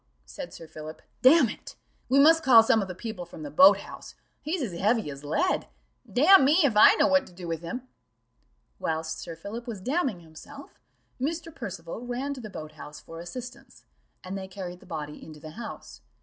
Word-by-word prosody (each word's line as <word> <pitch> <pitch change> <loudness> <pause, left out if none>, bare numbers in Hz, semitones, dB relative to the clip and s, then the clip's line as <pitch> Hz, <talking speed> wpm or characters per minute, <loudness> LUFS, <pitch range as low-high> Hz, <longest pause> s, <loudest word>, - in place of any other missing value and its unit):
said - - -8
Sir 165 - -11
Philip: 155 0 -10 0.2
"Damn 270 +1 +7
it, 210 - -9 0.3
we 265 - +3
must 320 +3 +6
call 235 -5 +7
some 225 -1 +3
of 195 - -3
the 185 - -7
people 220 -2 -6
from 175 - -11
the 290 - -7
boat 280 +1 +7
house - - -11 0.3
he's 315 +1 -2
as 210 -8 -4
heavy 215 -5 +1
as 140 +1 -10
lead: 160 - 0 0.4
damn 330 +7 +7
me, 290 +5 +4
if 260 -7 +2
I 210 - +8
know - - +3
what 280 0 +3
to - - -16
do 175 0 -9
with 165 -1 -3
him." 245 +10 -6 0.9
Whilst 160 0 -3
Sir 165 - -7
Philip 215 +9 -8
was 225 -5 -5
damning 255 - -1
himself, 160 -1 -13 0.4
Mr. 325 +3 -3
Percival 195 - -7
ran 250 +3 -3
to 265 - -9
the 215 - -8
boat 155 -5 -8
house 150 0 -11
for 165 0 -11
assistance, 250 +9 -10 0.4
and 185 - -6
they 190 -1 -5
carried 180 -2 -8
the - - -18
body 150 -3 -6
into 155 -1 -11
the 155 0 -10
house. 230 +6 -9
210 Hz, 200 wpm, -27 LUFS, 165-265 Hz, 0.9 s, I